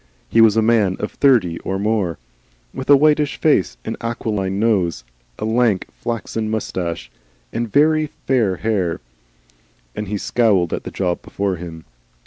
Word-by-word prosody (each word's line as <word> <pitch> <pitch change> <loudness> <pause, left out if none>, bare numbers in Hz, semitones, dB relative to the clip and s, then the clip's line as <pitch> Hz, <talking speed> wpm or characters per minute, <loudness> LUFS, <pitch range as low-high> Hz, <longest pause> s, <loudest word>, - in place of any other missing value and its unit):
He 115 - +4
was 110 -1 +5
a 110 - +4
man 110 -5 +2
of 105 - -3
thirty 115 -12 +3
or 95 - -3
more, 100 -5 0 0.6
with 130 - -6
a 145 - +9
whitish 150 0 +2
face, 120 - +2
an - - -4
aquiline 105 -5 -2
nose, 95 - +1 0.3
a - - -4
lank, 110 -3 +2
flaxen 115 -2 -4
moustache, 85 - -3 0.4
and 115 -1 -3
very 155 +1 +3
fair 120 -9 0
hair, 95 -4 -1 1.0
and 105 - -4
he 105 +2 -2
scowled 100 -6 +1
at - - -4
the - - -4
job 90 -2 -2
before 100 -2 -2
him. 80 -2 -9
110 Hz, 150 wpm, -20 LUFS, 95-115 Hz, 1.0 s, a